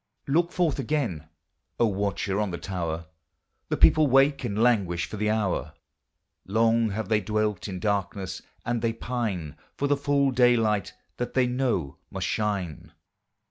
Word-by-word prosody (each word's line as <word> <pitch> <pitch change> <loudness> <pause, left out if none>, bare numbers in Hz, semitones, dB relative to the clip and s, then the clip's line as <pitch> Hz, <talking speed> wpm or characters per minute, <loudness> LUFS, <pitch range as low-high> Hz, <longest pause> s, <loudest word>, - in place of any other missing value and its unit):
Look 170 +5 +2
forth 165 -6 +1
again, 115 - -2 0.5
O 120 - +5
watcher 100 -1 -1
on 105 -2 0
the 85 - -4
tower, 85 -4 -4 0.6
The - - 0
people 155 -1 +6
wake 135 +2 +4
and 100 - -2
languish 100 -7 +2
for - - -8
the 105 +1 0
hour; 105 -4 -1 0.7
Long 115 +2 +2
have 110 +2 -3
they 110 -1 +2
dwelt 105 +1 -1
in 95 -2 -5
darkness, 100 -1 -2 0.2
and 120 -1 -1
they 115 -1 +1
pine 105 - -3 0.2
For 140 - 0
the 145 - +3
full 140 -1 +2
daylight 115 -5 +3 0.2
that 125 - -4
they 130 -1 +4
know 125 - -1
must - - -3
shine. 100 -7 -2
110 Hz, 150 wpm, -26 LUFS, 95-125 Hz, 0.7 s, people